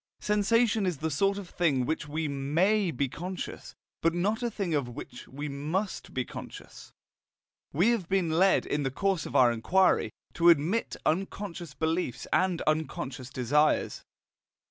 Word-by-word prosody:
Sensation 210 0 +2
is 175 -5 -1
the 160 +3 -2
sort 195 +7 +1
of 200 -3 -6
thing 155 -8 +1
of - - -4
which 160 -1 -2
we 155 +2 -2
MAY 170 +9 +1
be 140 -2 -1
conscious, 180 +7 -6 0.3
but 165 +1 +2
not 205 +6 0
a 240 - 0
thing 200 -6 -3
of 140 -4 0
which 120 0 -9
we 145 +3 -6
MUST 155 +8 -3
be 125 -1 -2
conscious. - - -10 0.8
We 175 +10 +3
have 205 -8 -2
been 185 -4 +1
led, 185 +4 +4
in 145 - -1
the 135 - 0
course 190 +3 -1
of - - -9
our 125 -2 +6
inquiry, 180 +12 +2 0.2
to 170 0 +5
admit 170 +8 +2
unconscious 180 0 -2
beliefs 160 -6 -1
and 185 -2 +2
unconscious 140 -4 -2
desires. 145 +5 +1
165 Hz, 160 wpm, -29 LUFS, 145-195 Hz, 0.8 s, our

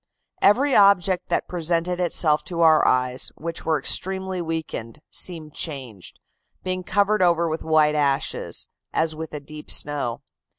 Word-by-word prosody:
Every 265 +7 +4
object 195 -2 +3
that - - 0
presented 175 +1 -1
itself 155 -4 +2
to 170 -2 -3
our 160 -2 +5
eyes 125 0 +1
(which 170 +1 -6
were 160 -1 +2
extremely 190 +5 0
weakened) 160 -7 -5
seemed 160 -4 -2
changed, 130 - -4 0.5
being 185 0 -2
covered 205 +2 +1
over 170 -1 +3
with 160 0 -3
white 155 -1 +3
ashes, 140 -2 -1 0.3
as 160 0 0
with 160 0 -7
a 150 - -5
deep 150 +1 -12
snow. 145 -5 -1
160 Hz, 140 wpm, -23 LUFS, 150-180 Hz, 0.5 s, our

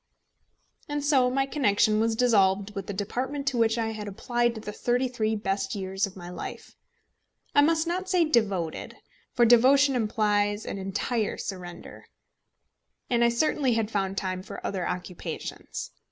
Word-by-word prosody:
And 290 0 -2
so 265 -4 +4
my 270 +2 +1
connection 215 -6 +2
was 225 0 +1
dissolved 205 -4 +3
with 195 -2 -5
the - - -3
department 255 +8 -3
to 250 - -4
which 225 0 +3
I 225 -1 -1
had 215 -1 -6
applied 240 +4 0
the 215 -1 -6
thirty 245 +4 0
three 220 -3 -1
best 205 +3 -2
years 195 +1 -1
of 190 - -13
my 175 -2 -9
life; - - -8 0.8
I 285 - +6
must 320 +2 +3
not 365 +2 -2
say 360 -3 +3
devoted, 200 - 0 0.4
for 240 - +5
devotion 265 +4 +5
implies 210 -2 +1
an 195 - -4
entire 205 +3 -2
surrender, 180 -3 -8 1.1
and 235 -1 +3
I 235 - +5
certainly 260 +1 +1
had 225 -1 -1
found 195 -2 -1
time 185 -1 -2
for 190 - -9
other 185 -3 -2
occupations. 180 -1 -6
220 Hz, 155 wpm, -27 LUFS, 195-250 Hz, 1.1 s, I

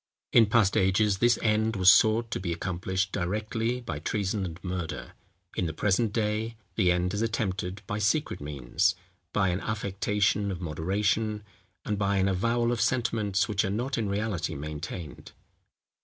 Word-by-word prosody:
In 115 -2 +7
past 105 -3 +3
ages 95 +1 +3
this 120 -1 +4
end 110 +1 +2
was 95 -1 +7
sought 110 +3 +4
to - - -1
be 90 -2 -3
accomplished 95 +2 -2
directly 110 +6 -1
by 80 -11 -5
treason 100 +4 -1
and 85 0 -8
murder; 90 -3 -4 0.4
in 90 - 0
the 80 - -4
present 105 +4 +1
day 110 +1 -1 0.2
the 95 -5 +3
end 90 +1 0
is 105 - -1
attempted 100 -3 -2
by 105 +2 -3
secret 115 - 0
means, 70 -4 0 0.4
by 95 -2 +2
an 90 +2 -1
affectation 105 -1 0
of 95 -3 -4
moderation, 100 +6 -1 0.4
and 105 -1 -1
by 100 0 +1
an 95 0 +2
avowal 115 +5 +1
of 120 -3 -1
sentiments 105 -5 +1
which 105 -2 +1
are 100 - -1
not 120 +7 -1
in 110 -3 -1
reality 100 -2 -2
maintained. 75 +2 -7
100 Hz, 160 wpm, -28 LUFS, 95-110 Hz, 0.4 s, In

